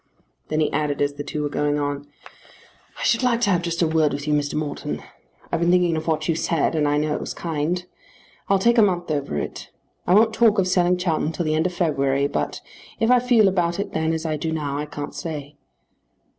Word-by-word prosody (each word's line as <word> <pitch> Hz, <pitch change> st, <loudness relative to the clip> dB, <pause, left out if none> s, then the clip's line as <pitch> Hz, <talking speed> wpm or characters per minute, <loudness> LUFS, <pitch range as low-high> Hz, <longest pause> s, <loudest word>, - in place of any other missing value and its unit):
Then 155 Hz, 0 st, 0 dB
he 155 Hz, -, +1 dB
added 145 Hz, -1 st, -1 dB
as 145 Hz, 0 st, +1 dB
the 145 Hz, 0 st, -6 dB
two 150 Hz, +1 st, -4 dB
were 145 Hz, -, -1 dB
going 145 Hz, 0 st, 0 dB
on, 145 Hz, 0 st, -3 dB, 0.9 s
"I -, -, -4 dB
should 230 Hz, -, +2 dB
like 245 Hz, -2 st, +2 dB
to 205 Hz, -, +3 dB
have 175 Hz, -2 st, +2 dB
just 170 Hz, 0 st, -1 dB
a -, -, +3 dB
word 155 Hz, -2 st, +2 dB
with 145 Hz, +1 st, -5 dB
you, 150 Hz, -, +2 dB
Mr. 145 Hz, 0 st, 0 dB
Morton. 150 Hz, -1 st, -4 dB, 0.5 s
I've -, -, 0 dB
been 170 Hz, +1 st, +2 dB
thinking 175 Hz, -2 st, +3 dB
of 160 Hz, +1 st, -4 dB
what 160 Hz, -1 st, 0 dB
you 165 Hz, -, +2 dB
said, 165 Hz, -1 st, 0 dB
and 155 Hz, -2 st, +1 dB
I 145 Hz, 0 st, +2 dB
know 150 Hz, 0 st, 0 dB
it -, -, -2 dB
was -, -, -5 dB
kind. 170 Hz, +2 st, -2 dB, 0.6 s
I'll 195 Hz, -, +5 dB
take 235 Hz, +5 st, +3 dB
a -, -, +8 dB
month 175 Hz, -5 st, +1 dB
over 140 Hz, -, -2 dB
it. -, -, -5 dB, 0.4 s
I 180 Hz, -, +5 dB
won't 220 Hz, +1 st, +5 dB
talk 220 Hz, -1 st, +4 dB
of 190 Hz, -2 st, +2 dB
selling 180 Hz, -1 st, +2 dB
Chowton 165 Hz, -3 st, 0 dB
till 170 Hz, -, -2 dB
the 155 Hz, -, +1 dB
end 160 Hz, +3 st, +2 dB
of 180 Hz, -, -6 dB
February; 140 Hz, -5 st, +1 dB
but 140 Hz, -, -2 dB, 0.4 s
if 225 Hz, +1 st, +3 dB
I 250 Hz, -, +6 dB
feel 240 Hz, -4 st, +4 dB
about 175 Hz, -2 st, 0 dB
it 200 Hz, -, -3 dB
then 160 Hz, 0 st, 0 dB
as 160 Hz, 0 st, -3 dB
I 155 Hz, -1 st, -1 dB
do 160 Hz, +2 st, -3 dB
now 145 Hz, -3 st, -2 dB
I 150 Hz, -, -4 dB
can't 145 Hz, -1 st, -6 dB
stay." 150 Hz, -3 st, -6 dB
160 Hz, 240 wpm, -23 LUFS, 150-180 Hz, 0.9 s, a